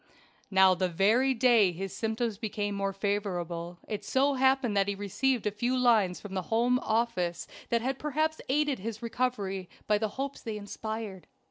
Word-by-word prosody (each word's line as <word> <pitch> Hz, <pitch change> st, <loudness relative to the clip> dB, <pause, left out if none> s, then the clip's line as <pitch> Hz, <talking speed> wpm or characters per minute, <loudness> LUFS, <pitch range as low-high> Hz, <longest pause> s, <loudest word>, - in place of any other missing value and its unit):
Now 190 Hz, -1 st, +6 dB
the 185 Hz, 0 st, 0 dB
very 225 Hz, +10 st, +3 dB
day 230 Hz, -6 st, +5 dB
his 190 Hz, +2 st, -6 dB
symptoms 220 Hz, 0 st, -2 dB
became 205 Hz, -2 st, -2 dB
more 195 Hz, 0 st, -1 dB
favorable 180 Hz, -4 st, -3 dB
it 210 Hz, -1 st, -4 dB
so 275 Hz, +6 st, +2 dB
happened 265 Hz, -4 st, +2 dB
that 200 Hz, 0 st, +3 dB
he 200 Hz, -, 0 dB
had 195 Hz, -, -11 dB
received 235 Hz, +4 st, 0 dB
a 210 Hz, -, +1 dB
few 240 Hz, +5 st, 0 dB
lines 220 Hz, -8 st, +3 dB
from 205 Hz, -2 st, -9 dB
the 190 Hz, -, -1 dB
Home 240 Hz, +3 st, +3 dB
Office 220 Hz, -8 st, -1 dB, 0.2 s
that 235 Hz, -1 st, +1 dB
had 265 Hz, +1 st, -2 dB
perhaps 310 Hz, +1 st, -1 dB
aided 290 Hz, 0 st, +1 dB
his 220 Hz, +2 st, -6 dB
recovery 205 Hz, -6 st, -2 dB, 0.2 s
by 210 Hz, -1 st, +2 dB
the 220 Hz, -1 st, -1 dB
hopes 275 Hz, +1 st, -4 dB
they 220 Hz, -2 st, -4 dB
inspired. 210 Hz, -1 st, -6 dB
215 Hz, 175 wpm, -29 LUFS, 195-250 Hz, 0.2 s, Now